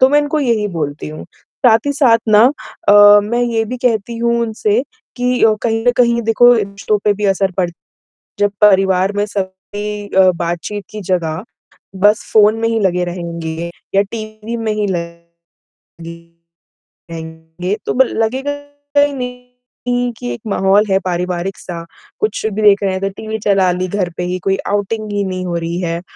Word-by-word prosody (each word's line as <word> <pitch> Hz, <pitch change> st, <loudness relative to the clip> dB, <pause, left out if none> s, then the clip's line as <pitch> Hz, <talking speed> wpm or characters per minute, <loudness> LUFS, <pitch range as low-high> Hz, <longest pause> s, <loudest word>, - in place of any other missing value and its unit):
तो 260 Hz, -, +7 dB
मैं 290 Hz, +2 st, +4 dB
इनको 295 Hz, +1 st, -1 dB
यही 230 Hz, -6 st, +1 dB
बोलती 150 Hz, -6 st, -4 dB
हूँ। 155 Hz, 0 st, -8 dB, 0.4 s
साथ 225 Hz, +2 st, +4 dB
ही 285 Hz, -, +1 dB
साथ 255 Hz, -5 st, +4 dB
ना 215 Hz, +1 st, +6 dB, 0.5 s
अ, 205 Hz, 0 st, +8 dB
मैं 235 Hz, +4 st, -1 dB
ये 230 Hz, -2 st, 0 dB
भी 250 Hz, +4 st, -5 dB
कहती 230 Hz, -1 st, 0 dB
हूँ 235 Hz, 0 st, +1 dB
उनसे, 220 Hz, 0 st, 0 dB, 0.3 s
कि 250 Hz, 0 st, 0 dB
अ, 220 Hz, -1 st, +5 dB
कहीं 225 Hz, -1 st, 0 dB
न -, -, +7 dB
कहीं 235 Hz, -1 st, +3 dB
देखो 225 Hz, +2 st, +5 dB
रिश्तों 205 Hz, -1 st, -1 dB
पे 210 Hz, -, +4 dB
भी 210 Hz, +1 st, -4 dB
असर 195 Hz, 0 st, 0 dB
पड़ 180 Hz, -2 st, 0 dB, 0.7 s
जब 205 Hz, 0 st, +2 dB
परिवार 190 Hz, -2 st, +4 dB
में 205 Hz, 0 st, +1 dB
सभी 205 Hz, +1 st, -5 dB
अ, 190 Hz, -1 st, +4 dB
बातचीत 175 Hz, +4 st, -4 dB
की 215 Hz, -1 st, -7 dB
जगह, 170 Hz, -2 st, -2 dB, 0.5 s
बस 205 Hz, +4 st, +3 dB
फ़ोन 215 Hz, 0 st, +5 dB
में 230 Hz, -, +1 dB
ही 225 Hz, -1 st, 0 dB
लगे 180 Hz, -3 st, +1 dB
रहेंगे 170 Hz, -1 st, -5 dB, 0.2 s
या 195 Hz, -, +5 dB
टीवी 215 Hz, +2 st, -7 dB
में 225 Hz, -1 st, -2 dB
ही 210 Hz, -1 st, -1 dB
लगे 170 Hz, -2 st, -7 dB, 1.5 s
रहेंगे, 160 Hz, +3 st, -5 dB
तो -, -, -1 dB
ब 265 Hz, -, +5 dB
लगेगा 260 Hz, +6 st, -1 dB, 0.5 s
ही 285 Hz, 0 st, +3 dB
नहीं 250 Hz, -1 st, -5 dB
कि 120 Hz, -, -5 dB
एक 120 Hz, -, -9 dB
माहौल 195 Hz, +1 st, +3 dB
है 190 Hz, 0 st, +3 dB
पारिवारिक 180 Hz, +1 st, -2 dB
सा, 170 Hz, -2 st, -7 dB, 0.4 s
कुछ 425 Hz, -, -1 dB
भी 215 Hz, 0 st, -3 dB
देख 205 Hz, -1 st, +5 dB
रहे 195 Hz, -, +1 dB
हैं, 190 Hz, -, -2 dB
इधर 195 Hz, +1 st, -1 dB
टीवी 220 Hz, 0 st, -4 dB
चला 195 Hz, -3 st, +3 dB
ली 185 Hz, +1 st, -2 dB
घर 185 Hz, -2 st, -1 dB
पे 180 Hz, -, -2 dB
ही, 180 Hz, +1 st, -2 dB
कोई 195 Hz, +1 st, 0 dB
आउटिंग 205 Hz, +1 st, -2 dB
ही 205 Hz, 0 st, 0 dB
नहीं 185 Hz, -1 st, -4 dB
हो 175 Hz, -, -3 dB
रही 170 Hz, +1 st, -3 dB
है। 170 Hz, -1 st, -2 dB
205 Hz, 180 wpm, -16 LUFS, 180-225 Hz, 1.5 s, अ